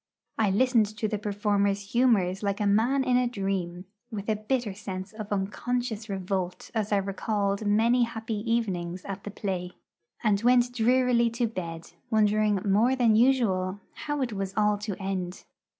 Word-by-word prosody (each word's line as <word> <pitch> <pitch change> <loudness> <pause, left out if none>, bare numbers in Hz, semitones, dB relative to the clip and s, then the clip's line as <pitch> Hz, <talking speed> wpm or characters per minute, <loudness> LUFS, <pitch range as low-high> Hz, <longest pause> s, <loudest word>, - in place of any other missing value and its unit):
I 215 -2 +3
listened 230 +1 +3
to 215 - 0
the 210 -1 -2
performer's 200 -1 0
humours 205 -7 +3
like 200 -1 -1
a 210 - 0
man 230 +7 +3
in 250 -1 +3
a 250 0 +2
dream, 195 -5 -3 0.2
with 210 -2 -5
a 215 - +2
bitter 215 0 -2
sense 190 -1 -6
of 215 -1 -7
unconscious 220 +3 -2
revolt 185 -2 -3
as 215 -2 -1
I 205 - +4
recalled 200 +1 -1
many 230 +4 +3
happy 225 -1 -5 0.2
evenings 185 -6 -1
at 195 0 -6
the - - -4
play, 185 -3 -4 0.5
and 205 -3 +2
went 245 0 +4
drearily 245 0 +3
to 235 +1 -1
bed, 170 -7 -6 0.2
wondering 215 -1 +3
more 215 +6 +3
than 235 -4 +3
usual 210 -6 +2
how 295 -2 -3
it 240 -4 -3
was 195 -1 -4
all 210 -1 +2
to 205 -2 -4
end. 190 -2 -4
210 Hz, 165 wpm, -27 LUFS, 195-235 Hz, 0.5 s, I